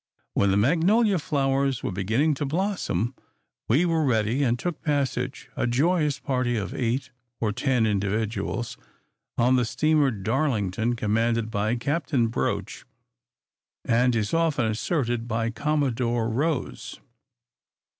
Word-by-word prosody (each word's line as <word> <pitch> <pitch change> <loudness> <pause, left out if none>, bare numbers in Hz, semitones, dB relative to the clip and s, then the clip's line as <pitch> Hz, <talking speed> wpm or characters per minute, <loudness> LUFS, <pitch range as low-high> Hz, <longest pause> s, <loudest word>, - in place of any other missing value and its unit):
When 100 - +2
the 95 - +3
magnolia 180 - +3
flowers 135 -3 0
were - - -2
beginning 110 - +1
to 145 +1 -3
blossom, 150 - -1 0.5
we 145 +10 +3
were 165 -2 +1
ready, 115 0 +1
and 120 -3 +2
took 175 +3 -4
passage 145 -4 -1
a - - 0
joyous 150 +3 +2
party 125 -4 -1
of 100 - -3
eight 130 +2 -2 0.3
or 110 -2 0
ten 125 +1 +1
individuals 110 +3 -2 0.6
on 125 +2 +4
the 125 - +2
steamer 155 +4 +2
"Darlington," 110 -1 0
commanded 115 +1 0
by 110 +2 0
Capt. 145 +5 -2 0.2
Broch, - - -2 1.0
and, 120 +1 +3
as 105 -2 0
is - - -8
often 165 -7 +2
asserted, 120 +1 -1
by 115 0 -1
"Commodore 125 -5 0
Rose." 140 +4 -2
125 Hz, 125 wpm, -25 LUFS, 115-145 Hz, 1.0 s, on